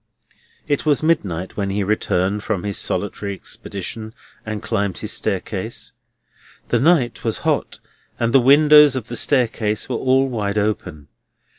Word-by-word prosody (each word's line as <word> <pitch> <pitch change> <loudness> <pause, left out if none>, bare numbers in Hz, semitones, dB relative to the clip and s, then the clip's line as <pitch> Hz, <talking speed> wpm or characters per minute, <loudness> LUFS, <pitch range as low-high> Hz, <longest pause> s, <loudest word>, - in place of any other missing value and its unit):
It 145 -2 0
was 150 -1 +2
midnight 95 - 0
when 100 -1 -2
he 100 +1 -1
returned 100 -1 0
from 100 -3 -2
his 100 -1 -2
solitary 100 0 -2
expedition 110 +4 -6 0.3
and 110 -2 -5
climbed 100 -5 -1
his - - -5
staircase. - - -3 0.8
The 120 - +2
night 140 -4 +2
was 115 -2 -1
hot, - - -1 0.4
and 115 0 0
the 135 - +7
windows 145 +2 +6
of 120 -4 -5
the 120 - -4
staircase 115 -5 +1
were 125 - -1
all 130 +2 +2
wide 105 -5 -2
open. 100 -8 -2
110 Hz, 145 wpm, -20 LUFS, 100-130 Hz, 0.8 s, the